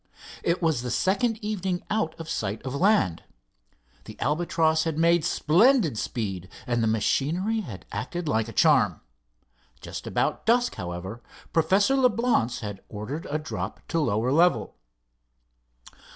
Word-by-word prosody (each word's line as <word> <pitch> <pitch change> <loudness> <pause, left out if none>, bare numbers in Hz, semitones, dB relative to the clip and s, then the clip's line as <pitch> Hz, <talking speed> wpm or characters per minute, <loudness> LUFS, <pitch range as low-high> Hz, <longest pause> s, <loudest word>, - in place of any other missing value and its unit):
It 170 +1 0
was 160 -7 +2
the 125 - -4
second 220 - +1
evening 190 -4 -2
out 190 -7 -1
of 165 - -7
sight 105 -10 -2
of 130 - -4
land. 140 - +2 0.8
The - - -11
Albatross 160 +1 +1
had 160 -2 -2
made 170 0 +3
splendid 180 - +3
speed, 95 -5 -4 0.2
and 120 -1 0
the 110 - +2
machinery 160 - 0
had 120 - -8
acted 170 +6 -4
like 110 -6 +1
a - - -7
charm. 125 - +3 0.8
Just - - -7
about - - -1
dusk, 245 +1 +3
however, 95 +4 -6 0.3
Professor 195 +10 +3
Leblance 240 - +2
had 100 -3 -6
ordered 115 +10 -6
a 150 - 0
drop 155 +1 -5
to 165 - 0
lower 120 -3 +1
level. 170 +5 +3
155 Hz, 135 wpm, -26 LUFS, 115-185 Hz, 0.8 s, made